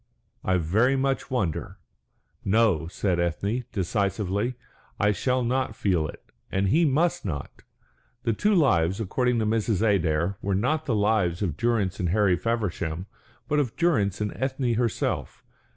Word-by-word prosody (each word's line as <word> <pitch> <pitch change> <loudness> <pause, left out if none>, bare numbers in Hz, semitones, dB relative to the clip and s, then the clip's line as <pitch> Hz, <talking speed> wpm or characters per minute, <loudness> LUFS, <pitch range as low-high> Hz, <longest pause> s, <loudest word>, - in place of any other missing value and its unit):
I 95 0 +2
very 110 +11 +2
much 135 0 -1
wonder." 100 -12 -2 0.7
"No," 100 -6 +2
said 90 0 -1
Ethne, 100 +8 -1
decisively. 100 +4 -1 0.4
"I 105 +1 +3
shall 125 +6 0
not 125 -2 -1
feel 90 -8 +1
it, - - -11 0.3
and 95 0 +1
he 165 - +4
must 160 +4 +1
not." 75 -8 -5 0.6
The 115 -2 +1
two 205 - +2
lives, 95 - +3
according 125 +4 0
to 110 - +1
Mrs. 110 -1 +1
Adair, 90 -1 +1
were 100 -1 0
not 155 +10 0
the 120 - +1
lives 105 -4 +1
of 85 -7 -1
Durrance 110 -5 0
and 90 - 0
Harry 100 -1 +3
Feversham, 90 -5 -2 0.4
but 150 - +1
of 130 -6 -1
Durrance 110 - +1
and 105 -1 -2
Ethne 130 -2 -1
herself. 115 -1 -2
105 Hz, 150 wpm, -26 LUFS, 95-125 Hz, 0.7 s, he